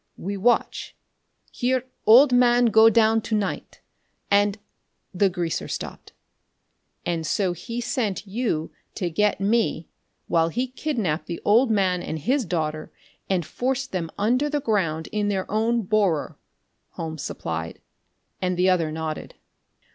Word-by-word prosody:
We 200 +3 -4
watch, 235 +5 0 0.6
hear 255 0 0 0.2
old 250 +4 +8
man 245 0 +5
go 220 0 +8
down 225 0 +3
to 220 - -2
night, 205 -2 -3 0.5
and 205 +1 +3 0.3
" - - -49
The 200 - +6
greaser 175 -2 -3
stopped. - - -7 0.9
"And 170 -2 -1
so 180 +3 0
he 230 +7 -6
sent 220 -4 -2
you 200 -6 -2 0.2
to 180 -5 -2
get 210 +5 +1
me, 200 -5 0 0.4
while 165 -1 +2
he 245 +9 -1
kidnapped 235 - -2
the 170 - -4
old 230 +5 +4
man 190 -4 +1
and 160 - -4
his 255 - 0
daughter 155 -3 -3 0.4
and 180 -4 0
forced 260 - -2
them 170 -3 -3
under 250 +8 +1
the 295 0 0
ground 165 -9 0
in 210 -1 0
their 195 -2 -1
own 225 +2 +1
borer," 195 -6 +1 0.6
Holmes 160 -2 -5
supplied, 80 - -5 0.6
and 180 -1 -1
the 185 +1 +4
other 165 -4 +1
nodded. 155 0 -5
200 Hz, 140 wpm, -24 LUFS, 170-235 Hz, 0.9 s, old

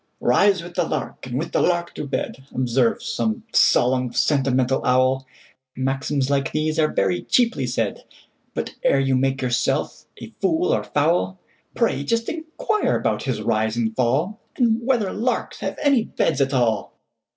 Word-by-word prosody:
"Rise 200 -4 +3
with 175 0 -10
the - - +1
lark, 150 -3 -4
and 125 0 -3
with 165 +4 -3
the - - +1
lark 175 -1 0
to 150 - -5
bed,"Observes 130 -3 -1
some 225 0 -2
solemn, 125 0 +3
sentimental 130 -2 +1
owl; 130 +1 +2 0.5
Maxims 135 +1 -1
like 140 -1 0
these 155 +1 -1
are 155 - +4
very 95 -2 0
cheaply 230 - +1
said; 115 -4 -2 0.5
But, - - -3
ere 140 - +4
you 135 -1 +2
make 135 +1 0
yourself 125 -1 -1
a - - -10
fool 360 +6 +2
or - - 0
fowl, 145 - +1 0.4
Pray 140 - +1
just 230 +9 0
inquire 320 +6 -1
about - - -1
his 120 -6 -2
rise 110 +1 0
and 110 -2 -1
fall, 145 - 0 0.2
And 235 -2 +2
whether 235 -6 +1
larks 245 +4 -2
have - - -4
any 275 -6 +3
beds 145 -4 0
at 135 0 +2
all! 120 -6 0
135 Hz, 160 wpm, -22 LUFS, 125-200 Hz, 0.5 s, are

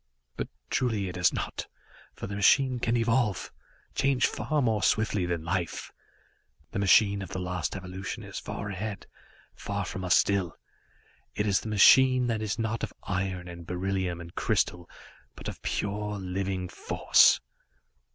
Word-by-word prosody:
But - - -3 0.2
truly, 110 -7 0
it 90 - -7
has 90 -1 +3
not, - - -4 0.5
for - - -6
the 100 - -5
machine 125 +5 +4
can 120 +1 +1
evolve, 115 -3 +1 0.4
change 135 -2 +2
far 155 -1 -1
more 110 -6 +1
swiftly 105 -2 +1
than 85 -2 -2
life. 85 0 -3 0.8
The 110 - -2
machine 100 0 +4
of 95 - -6
the 95 - -4
last 90 0 -3
evolution 95 +1 -6
is - - -6
far 100 - -5
ahead, 100 +1 -5 0.5
far 100 -1 -4
from 95 +1 -5
us 90 0 +4
still. 95 -4 +1 0.8
It 105 - 0
is 100 -2 +3
the 110 - -6
machine 130 +5 +6
that 115 -2 -1
is 110 0 -2
not 115 0 -2
of - - -2
iron 90 -1 -2
and 85 -1 -9
beryllium 90 -1 -2
and 85 0 -10
crystal, 90 -1 0 0.5
but - - -8
of - - -7
pure, 105 +1 -2
living 95 0 -3
force. - - +4
100 Hz, 155 wpm, -28 LUFS, 90-110 Hz, 0.8 s, machine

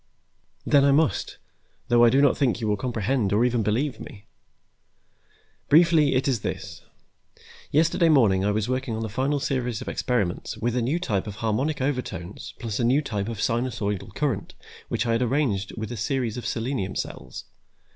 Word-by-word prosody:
"Then 140 -2 +5
I 140 - +5
must, 145 -6 +1 0.5
though 120 0 +5
I 120 - +7
do 135 +4 +4
not 140 - +4
think 130 -5 +1
you 110 - -2
will 105 - +2
comprehend 115 -1 -1
or 110 +4 +3
even 120 -2 +1
believe 120 +7 -1
me. 100 -1 -11 1.4
Briefly, 155 -3 +5
it 130 +2 +1
is 130 -4 +1
this: 95 -4 -5 0.9
yesterday 165 +3 +3
morning 110 -11 +4
I 100 - +1
was 105 +1 0
working 130 -2 -2
on 110 - -3
the 110 - -4
final 135 +7 0
series 125 -5 -2
of - - -8
experiments 110 -4 -2
with 115 +2 -1
a 125 - +1
new 135 +8 0
type 110 - -2
of 105 - -6
harmonic 115 +8 -1
overtones 125 - -4
plus 115 -3 -4
a - - +1
new 130 +6 +3
type 105 -6 -3
of 115 - -5
sinusoidal 110 -4 -2
current 135 -9 -2 0.3
which 115 - -1
I 115 - 0
had 115 +1 +1
arranged 120 -7 0
with 110 +1 -5
a 120 - -5
series 120 0 -1
of 120 -3 -5
selenium 115 -5 -2
cells. 65 - -6
120 Hz, 180 wpm, -25 LUFS, 105-135 Hz, 1.4 s, I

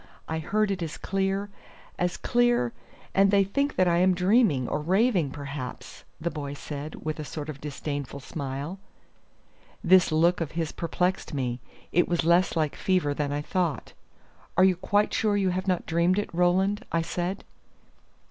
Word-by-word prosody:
I 160 0 -2
heard 210 +6 0
it 190 -2 -3
as 160 -2 -4
clear 195 +1 -1 0.5
as 180 0 0
clear; 240 - +2 0.4
and 195 0 +5
they 200 0 +5
think 280 +9 -1
that 185 - +3
I 170 -1 +3
am 185 +1 +4
dreaming, 180 - +3
or - - -1
raving 185 - +2
perhaps," 140 -2 -7
the 170 +2 -2
boy 145 -2 -5
said, 145 +2 -7
with 155 0 -3
a - - -3
sort 150 +2 -6
of 140 -2 -7
disdainful 145 -1 -5
smile. 140 +5 -5 1.0
This 185 -1 +5
look 170 +3 +3
of 160 - -3
his 160 -1 -2
perplexed 180 0 -1
me; 125 -3 -2 0.3
it 175 - +3
was 175 -2 0
less 175 +3 +3
like 155 -3 0
fever 180 -6 +1
than 145 0 -2
I 145 +1 -2
thought. 170 -6 -2 0.6
"Are 185 - +6
you 190 -1 +5
quite 205 +4 +1
sure 210 -2 +2
you 190 -2 +2
have 185 +2 -3
not 185 -2 0
dreamed 170 +3 +2
it, 205 - -2
Roland?" 190 +5 +2
I 165 0 +1
said. 180 +3 -3
175 Hz, 170 wpm, -27 LUFS, 150-190 Hz, 1.0 s, Are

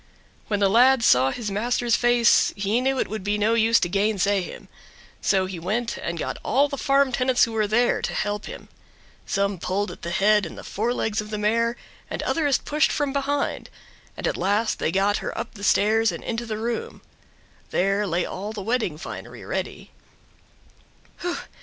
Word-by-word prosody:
When 205 -2 0
the 200 - +4
lad 245 +4 +5
saw 130 - +5
his 215 - -4
master's 240 +3 +1
face 240 -1 +4
he 205 +4 0
knew 265 +1 +1
it - - 0
would 215 -2 -5
be 205 +1 0
no 210 +2 +2
use 230 0 +4
to - - +1
gainsay 200 +1 +1
him. 180 - -9 0.5
So 190 -2 +2
he 185 -2 -6
went 225 +7 -2
and 170 0 -4
got - - -4
all 275 +5 +3
the 280 - -4
farm 275 0 +2
tenants 255 0 +2
who 230 - +1
were 215 -2 0
there 240 +4 +2
to - - -3
help 205 0 -2
him. - - -9 0.6
Some 200 -2 0
pulled 200 +4 -2
at - - -12
the 170 - -4
head 210 +3 +3
and - - -11
the - - -9
forelegs 220 0 -1
of 210 - -9
the 210 - -3
mare 230 +3 +1 0.3
and - - -4
others 290 -5 +1
pushed 305 +2 +1
from 285 -2 -1
behind, 280 0 -1 0.5
and - - -4
at - - 0
last 205 +5 0
they - - 0
got 200 +2 +2
her - - -5
up - - -5
the 200 - -11
stairs 220 +3 +3
and - - -7
into 235 0 -3
the 215 -1 -3
room. 230 +1 -4 0.7
There 195 +2 +1
lay 175 0 0
all 205 +3 -5
the 205 -3 -6
wedding 220 -8 -1
finery 170 - -8
ready. - - -5
215 Hz, 190 wpm, -24 LUFS, 200-240 Hz, 0.7 s, lad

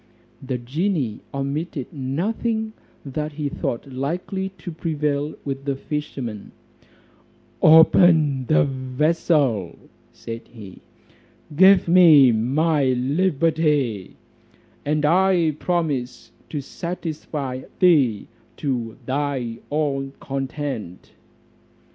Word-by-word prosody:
The 130 -1 -3
genie 135 - -2
omitted 140 0 -4
nothing 220 - -2 0.3
that 150 +2 -4
he 145 -1 -3
thought 120 - -3
likely 170 +8 -3
to 175 +1 -7
prevail 150 -2 -2
with 135 -1 -4
the 140 -1 -1
fisherman: 135 -7 -5 1.1
"Open 160 -4 +5
the 75 -5 +4
vessel," 130 - 0 0.3
said 115 0 -8
he, 105 -6 -12 0.7
"give 190 +3 +6
me 165 -7 +7
my 140 +7 +1
liberty, 145 - 0 0.7
and 150 +1 0
I 175 0 +3
promise 145 -8 -2 0.2
to 150 - -3
satisfy 150 -4 -5 0.2
thee 140 - +3 0.3
to 120 -6 -3
thy 130 -4 -2
own 140 -2 -1
content." 135 - -5
145 Hz, 85 wpm, -22 LUFS, 130-165 Hz, 1.1 s, me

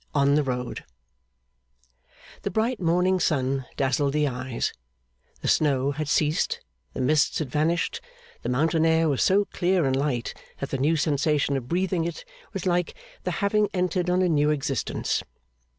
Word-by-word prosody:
On 140 0 +4
the 150 - +4
Road 125 -3 -3 1.6
The - - -2
bright 225 +2 0
morning 180 +2 +2
sun 135 -5 0
dazzled 140 +1 +1
the 150 -1 +2
eyes, 130 -2 -3 0.7
the - - -3
snow 140 -2 +2
had 150 +1 -4
ceased, 150 +1 +1 0.4
the - - -2
mists 150 +3 +2
had 145 -5 -3
vanished, 160 +3 0 0.4
the 120 - -3
mountain 160 +6 +2
air 160 0 +3
was 140 -4 +1
so 200 +2 +4
clear 180 -3 +1
and 135 -1 +1
light 135 -4 -1 0.2
that 140 - -5
the 135 - -1
new 150 +5 +3
sensation 145 -1 +1
of 130 -3 -3
breathing 180 0 0
it 170 - -5 0.3
was - - -5
like 175 -1 0 0.3
the - - 0 0.2
having 210 0 +2
entered 180 0 0
on 180 +1 +3
a - - +3
new 150 -3 +3
existence. 140 -3 -1
150 Hz, 160 wpm, -25 LUFS, 135-175 Hz, 1.6 s, On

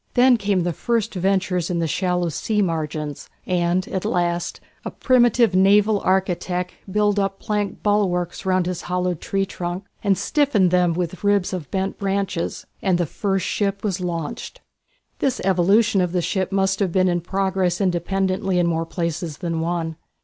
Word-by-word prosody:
Then 250 0 +6
came 200 -4 0
the 175 0 -1
first 230 +4 -1
ventures 185 -2 0
in 175 - -1
the 165 - 0
shallow 180 +2 0
sea 210 +6 0
margins, 155 -4 -3 0.2
and 180 0 0
at 190 - -2
last 175 -1 -1 0.2
a - - -4
primitive 240 -4 +3
naval 205 +3 +4
architect 180 -1 0 0.2
built 205 0 +2
up 195 0 -1
planked 210 -1 -2
bulwarks 190 -5 0
round 185 -2 +1
his 180 -1 -3
hollowed 180 -2 -1
tree 195 0 -1
trunk, 180 0 -5 0.2
and 200 -2 +2
stiffened 270 - +2
them 180 -1 +3
with 175 +2 -4
ribs 205 -2 +2
of 170 -7 -5
bent 195 0 -2
branches, 195 -3 -2 0.2
and 185 -3 +2
the 175 - +1
first 195 +3 -1
ship 200 -1 -1
was 195 -3 -1
launched. 175 +5 -4 0.6
This 265 -2 0
evolution 195 +3 +3
of 180 -1 -1
the 180 - +1
ship 190 +1 -1
must 195 0 +1
have 195 -4 +1
been 185 +1 +3
in 175 -1 +1
progress 190 -1 0
independently 190 +1 0
in 175 - +3
more 165 -1 -1
places 170 -2 -3
than 170 -3 -3
one. 165 -1 -2
185 Hz, 165 wpm, -22 LUFS, 175-200 Hz, 0.6 s, Then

